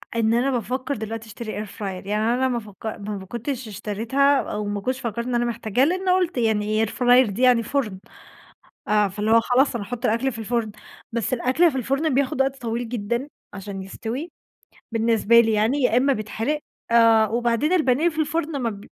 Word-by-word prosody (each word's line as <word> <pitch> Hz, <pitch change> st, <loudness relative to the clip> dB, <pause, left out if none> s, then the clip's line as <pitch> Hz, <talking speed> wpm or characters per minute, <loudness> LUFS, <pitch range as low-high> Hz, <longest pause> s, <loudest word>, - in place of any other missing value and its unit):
إن 225 Hz, -1 st, +2 dB
أنا 250 Hz, +4 st, +2 dB
بافكّر 255 Hz, +3 st, -2 dB
دلوقتي 225 Hz, +1 st, -6 dB
اشتري 215 Hz, -1 st, -6 dB
air -, -, -13 dB
fryer 215 Hz, -, -13 dB
يعني 195 Hz, +1 st, -3 dB, 0.2 s
أنا 260 Hz, +1 st, +1 dB
ما 245 Hz, -2 st, -1 dB
فك 210 Hz, -2 st, -14 dB
ما 210 Hz, -1 st, -4 dB
ب 190 Hz, -, -8 dB
كنتش 240 Hz, +5 st, -5 dB
اشتريتها 225 Hz, +7 st, +1 dB
أو 210 Hz, 0 st, -4 dB
ما 205 Hz, 0 st, -3 dB
كنتش 255 Hz, +5 st, -2 dB
فكّرت 235 Hz, -1 st, -3 dB
إن 250 Hz, -1 st, -2 dB
أنا 240 Hz, 0 st, +1 dB
محتاجاها 235 Hz, +1 st, 0 dB
لإنّي 370 Hz, +3 st, 0 dB
قُلت 365 Hz, -4 st, +1 dB
يعني 215 Hz, -1 st, +1 dB
air -, -, -6 dB
fryer 245 Hz, -1 st, +4 dB
دي 200 Hz, +5 st, -4 dB
يعني 250 Hz, -2 st, +5 dB
فُرن 220 Hz, -8 st, -2 dB, 0.9 s
آآ 210 Hz, -1 st, +3 dB
فاللي 205 Hz, +3 st, -2 dB
هو 230 Hz, 0 st, +6 dB
خلاص 250 Hz, +4 st, +2 dB
أنا 210 Hz, -, -4 dB
هاحط 245 Hz, +4 st, -7 dB
الأكل 235 Hz, +5 st, +1 dB
في 225 Hz, -, -9 dB
الفُرن، 225 Hz, -1 st, -2 dB, 0.4 s
بس 235 Hz, 0 st, -2 dB
الأكل 260 Hz, +8 st, +3 dB
في 265 Hz, -, -3 dB
الفُرن 275 Hz, +4 st, 0 dB
بياخد 270 Hz, -1 st, 0 dB
وقت 270 Hz, 0 st, -2 dB
طويل 235 Hz, 0 st, -3 dB
جدًا 235 Hz, +3 st, -2 dB, 0.2 s
عشان 195 Hz, -1 st, -7 dB
يستوي، 235 Hz, -, -5 dB, 0.6 s
بالنسبة 230 Hz, 0 st, +4 dB
لي 225 Hz, -1 st, +2 dB
يعني 225 Hz, +7 st, +1 dB
يا 245 Hz, -2 st, +3 dB
إمّا 270 Hz, +3 st, +4 dB
بيتحرق، 225 Hz, +6 st, -2 dB, 0.3 s
آآ 230 Hz, -1 st, +5 dB
وبعدين 235 Hz, -, 0 dB
البانيه 310 Hz, -2 st, +3 dB
في 320 Hz, -1 st, -3 dB
الفُرن 310 Hz, 0 st, -1 dB
ما 230 Hz, -, 0 dB
ب 200 Hz, -1 st, -10 dB
235 Hz, 195 wpm, -23 LUFS, 215-265 Hz, 0.9 s, هو